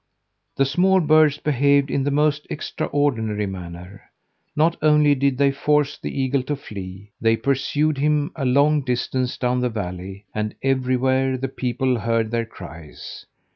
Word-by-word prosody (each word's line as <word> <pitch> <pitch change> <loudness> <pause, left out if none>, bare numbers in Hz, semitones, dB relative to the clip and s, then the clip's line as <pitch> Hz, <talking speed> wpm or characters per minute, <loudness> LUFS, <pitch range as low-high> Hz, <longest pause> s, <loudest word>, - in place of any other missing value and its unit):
The 135 - +2
small 185 +8 +3
birds 155 -2 +4
behaved 140 -1 +2
in 140 - 0
the 145 - 0
most 150 +1 +1
extraordinary 115 -9 -1
manner. 90 0 -9 0.5
Not 165 +3 +2
only 150 -1 +4
did 140 -1 0
they 140 0 +3
force 145 +1 0
the - - -5
eagle 135 0 +1
to 145 +3 -3
flee, 100 -5 -9
they 115 0 +3
pursued 140 +3 0
him 150 +2 +1
a 155 - -4
long 140 +4 +3
distance 125 0 -2
down 125 0 0
the 125 0 0
valley, 95 -2 -6
and 105 0 -3
everywhere 130 0 +1
the 135 0 -3
people 125 -1 -1
heard 115 0 0
their 115 -1 -1
cries. 85 -7 -11
130 Hz, 150 wpm, -22 LUFS, 115-145 Hz, 0.5 s, birds